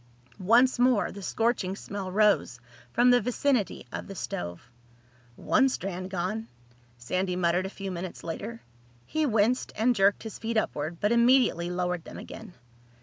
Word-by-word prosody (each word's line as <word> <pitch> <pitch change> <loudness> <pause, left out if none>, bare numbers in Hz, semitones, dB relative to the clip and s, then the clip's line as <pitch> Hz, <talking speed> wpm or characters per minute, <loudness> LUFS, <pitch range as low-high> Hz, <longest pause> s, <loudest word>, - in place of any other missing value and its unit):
Once 240 +7 +4
more 245 -4 +3
the 200 - -9
scorching 220 -2 0
smell 195 -2 -6
rose 205 - +2 0.3
from 245 - +4
the 245 - +5
vicinity 250 -1 0
of - - -6
the 195 - -8
stove. 85 - -6 0.6
"One 270 - +3
strand 185 -5 -4
gone," 195 +5 -3 0.5
Sandy 185 +10 -2
muttered 180 +1 +1
a - - -6
few 195 -1 -6
minutes 180 0 -6
later. 215 +8 -6 0.4
He 310 -1 0
winced 225 +2 +1
and 240 +3 +2
jerked 195 0 +3
his 220 - -7
feet 230 0 -2
upward 155 -5 -2
but 210 - +1
immediately 235 -7 +4
lowered 180 -1 -2
them - - -10
again. 180 - -10
200 Hz, 150 wpm, -28 LUFS, 180-235 Hz, 0.6 s, the